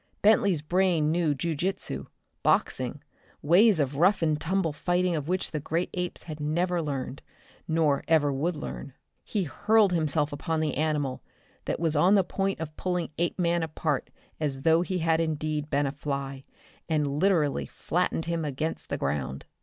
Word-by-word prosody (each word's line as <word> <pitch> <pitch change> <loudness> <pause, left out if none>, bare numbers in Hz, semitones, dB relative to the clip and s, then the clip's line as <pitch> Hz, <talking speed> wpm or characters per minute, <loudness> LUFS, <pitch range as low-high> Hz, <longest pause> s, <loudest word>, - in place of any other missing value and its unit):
Bentley's 200 -6 +4
brain 175 -2 +2
knew 165 -3 +1
jiu 165 +4 -2
jitsu, 180 +6 -3 0.3
boxing, - - +1 0.4
ways 185 +5 +5
of 140 -1 0
rough 180 +3 +4
and 155 -2 +1
tumble 175 -2 0
fighting 175 +2 +1
of 150 -2 -3
which 185 +2 -1
the 150 - -2
great 165 +4 -2
apes 180 -1 -1
had 155 -2 -7
never 170 +4 0
learned, 140 -3 -4 0.5
nor 160 -3 +2
ever 150 -3 +3
would 160 +6 -1
learn. 140 -2 -7 0.3
He 205 -3 -1
hurled 205 +5 +3
himself 155 -2 0
upon 160 +2 -2
the 155 -1 0
animal 150 -4 -1 0.4
that - - -2
was 160 -2 +1
on 180 +7 +5
the 195 - +5
point 195 +1 -2
of 155 -1 -6
pulling 180 -2 -1
Apeman 170 0 +1
apart 155 -3 -2 0.3
as 140 -3 -2
though 165 +1 +5
he 185 +1 -2
had 165 -1 +2
indeed 155 -1 -2
been 145 0 +1
a 135 - -1
fly, 140 -2 -4 0.4
and 150 -2 0
literally 165 -6 +2
flattened 175 -2 -1
him 170 -1 -1
against 150 +2 -3
the - - -1
ground. 70 -1 -3
160 Hz, 165 wpm, -27 LUFS, 145-175 Hz, 0.5 s, ways